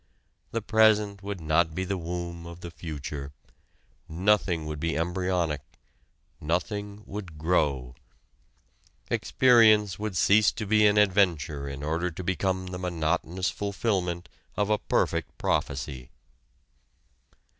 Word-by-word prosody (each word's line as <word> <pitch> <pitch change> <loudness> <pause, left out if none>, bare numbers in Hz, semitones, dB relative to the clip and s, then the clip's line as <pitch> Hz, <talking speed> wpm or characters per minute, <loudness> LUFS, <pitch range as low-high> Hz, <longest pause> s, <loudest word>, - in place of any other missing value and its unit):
The 115 -2 -3
present 105 -2 +3
would 100 -1 -5
not 80 0 +1
be 95 - -1
the 100 +1 -2
womb 85 -1 -5
of 85 +1 -10
the 85 - -7
future: 75 -4 -6 0.8
nothing 90 -1 +1
would 75 -1 -5
be 80 +1 -1
embryonic, 85 -3 -1 0.8
nothing 100 +6 -3
would 95 -6 -7
grow. 70 -6 0 1.2
Experience 110 -6 +4
would 105 -4 -3
cease 105 +3 +5
to 105 - -4
be 105 +1 +5
an 105 0 +3
adventure 85 -9 +2
in 70 +1 -7
order 80 +4 -1
to 90 +2 -7
become 95 0 -1
the 90 0 -6
monotonous 90 +1 -1
fulfilment 95 -4 -2 0.3
of 105 0 +1
a 105 - +2
perfect - - -1
prophecy. 65 -2 -2
90 Hz, 120 wpm, -27 LUFS, 80-100 Hz, 1.2 s, cease